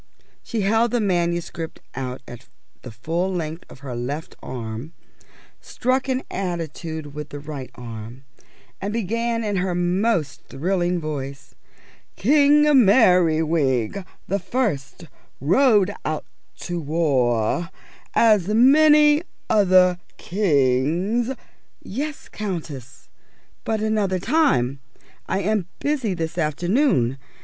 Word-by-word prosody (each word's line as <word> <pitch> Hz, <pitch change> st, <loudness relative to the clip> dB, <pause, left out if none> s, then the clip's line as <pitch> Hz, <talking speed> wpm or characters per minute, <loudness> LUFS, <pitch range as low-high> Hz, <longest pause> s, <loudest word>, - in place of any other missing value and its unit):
She 225 Hz, -, -3 dB
held 225 Hz, +4 st, +2 dB
the 240 Hz, -, 0 dB
manuscript 175 Hz, -4 st, -1 dB
out 130 Hz, 0 st, -5 dB
at 120 Hz, 0 st, -11 dB, 0.3 s
the 125 Hz, -, -9 dB
full 165 Hz, -, -2 dB
length 165 Hz, -2 st, -4 dB
of 130 Hz, -, -14 dB
her 130 Hz, -4 st, -6 dB
left 140 Hz, +6 st, -5 dB
arm, 120 Hz, +5 st, -6 dB, 0.7 s
struck 255 Hz, +1 st, -1 dB
an 260 Hz, 0 st, 0 dB
attitude 165 Hz, -4 st, -4 dB
with 150 Hz, 0 st, -7 dB
the 145 Hz, -, -7 dB
right 145 Hz, -3 st, -7 dB
arm, 115 Hz, +2 st, -9 dB, 0.6 s
and 200 Hz, +2 st, -2 dB
began 230 Hz, +2 st, -1 dB
in 205 Hz, -2 st, -1 dB
her 180 Hz, -1 st, -1 dB
most 175 Hz, -, 0 dB
thrilling 175 Hz, +4 st, -1 dB
voice: 140 Hz, -3 st, -6 dB, 0.6 s
"King 290 Hz, +5 st, +4 dB, 0.2 s
Merriwig 165 Hz, -, +3 dB, 0.2 s
the 200 Hz, -, 0 dB
First 180 Hz, -, -2 dB, 0.3 s
rode 205 Hz, -, +3 dB
out 155 Hz, -1 st, -3 dB, 0.4 s
to 175 Hz, -1 st, -3 dB
war, 145 Hz, -2 st, +1 dB, 0.5 s
_As 210 Hz, -3 st, +4 dB
many 295 Hz, +4 st, +6 dB, 0.3 s
other 185 Hz, -3 st, +4 dB, 0.2 s
kings 170 Hz, -, +1 dB
_" 265 Hz, -1 st, -4 dB, 0.5 s
"Yes, 285 Hz, +8 st, -5 dB
Countess, 165 Hz, -, -6 dB, 0.6 s
but 220 Hz, -1 st, -1 dB
another 210 Hz, -3 st, +1 dB
time. 140 Hz, -, +1 dB, 0.5 s
I 190 Hz, -, 0 dB
am 205 Hz, -2 st, 0 dB
busy 265 Hz, -10 st, -1 dB
this 165 Hz, 0 st, -4 dB
afternoon. 160 Hz, -, +1 dB
175 Hz, 110 wpm, -22 LUFS, 145-215 Hz, 0.7 s, many